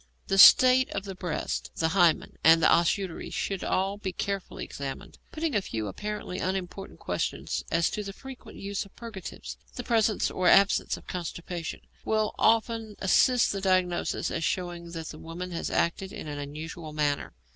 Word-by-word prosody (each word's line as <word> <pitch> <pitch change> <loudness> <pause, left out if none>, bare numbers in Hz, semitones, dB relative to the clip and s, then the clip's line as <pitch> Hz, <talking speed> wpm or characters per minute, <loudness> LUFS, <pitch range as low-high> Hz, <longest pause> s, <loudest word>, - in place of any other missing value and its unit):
The 195 - +2
state 255 +4 +8
of 195 - -3
the 195 -1 -6
breasts, 180 -4 -3
the 160 - +1
hymen, 175 -3 +3
and 165 +1 +7
the - - +7
os 170 -1 +5
uteri, 190 -4 -6
should 195 -2 -3
all 195 +2 0
be 190 -2 -3
carefully 195 +1 -4
examined. 140 +8 -7
Putting 315 -1 -2
a 205 - +2
few 110 - -4
apparently 210 - -5
unimportant 190 +1 -4
questions - - -2
as 165 0 +2
to 210 - -3
the 200 -1 -6
frequent 265 +5 -11
use 200 0 -3
of 200 - -18
purgatives, 225 -6 -8 0.2
the - - -5
presence 220 -3 +1
or 185 - 0
absence 200 0 +4
of - - -15
constipation, 170 -1 -5 0.2
will 215 -1 0
often 225 -1 +2
assist 245 +6 +3
the 195 - -3
diagnosis 185 -2 +1
as 165 - -2
showing 175 0 -2
that 165 -1 -5
the 155 - -9
woman 175 +3 -7
has 170 - -3
acted 190 +3 0
in - - -7
an 145 -1 -5
unusual 155 +2 -7
manner. 145 -1 -1
185 Hz, 175 wpm, -28 LUFS, 165-205 Hz, 0.2 s, state